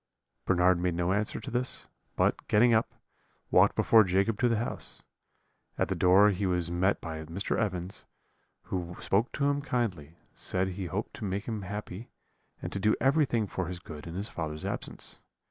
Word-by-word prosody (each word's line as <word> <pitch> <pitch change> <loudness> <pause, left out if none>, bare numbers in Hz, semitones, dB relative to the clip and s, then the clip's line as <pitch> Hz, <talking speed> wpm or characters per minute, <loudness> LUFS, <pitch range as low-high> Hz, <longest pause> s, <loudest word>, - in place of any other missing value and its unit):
"Bernard 90 -1 +4
made 90 -1 0
no 90 +2 +1
answer 105 +1 -1
to 110 - -7
this, 125 +2 -2 0.3
but, - - +1
getting 120 +3 +5
up, 110 0 +1 0.6
walked - - +5
before 110 -1 +6
Jacob 100 +3 +1
to 125 - +3
the 115 - +2
house. 120 - -5 0.7
At - - 0
the - - 0
door 95 +3 +6
he 100 0 -1
was 90 -2 0
met 95 +3 +2
by 80 -1 -6
Mr. 85 +6 -2
Evans, 90 -3 -3 0.6
who 90 -1 -4
spoke 105 +6 +1
to 140 - 0
him 145 0 +1
kindly, 105 - -2 0.2
said 95 +1 0
he 95 0 -4
hoped 100 +5 -4
to 125 - -8
make 100 +1 -2
him 110 -3 -3
happy, 105 +2 -6 0.5
and - - -4
to - - -2
do 105 +2 +3
everything 135 -5 +2
for 95 -3 -3
his 90 0 -4
good 80 -4 -10
in 85 - -7
his 100 +3 -2
father's 75 -2 -5
absence. - - -4
95 Hz, 180 wpm, -29 LUFS, 90-110 Hz, 0.7 s, before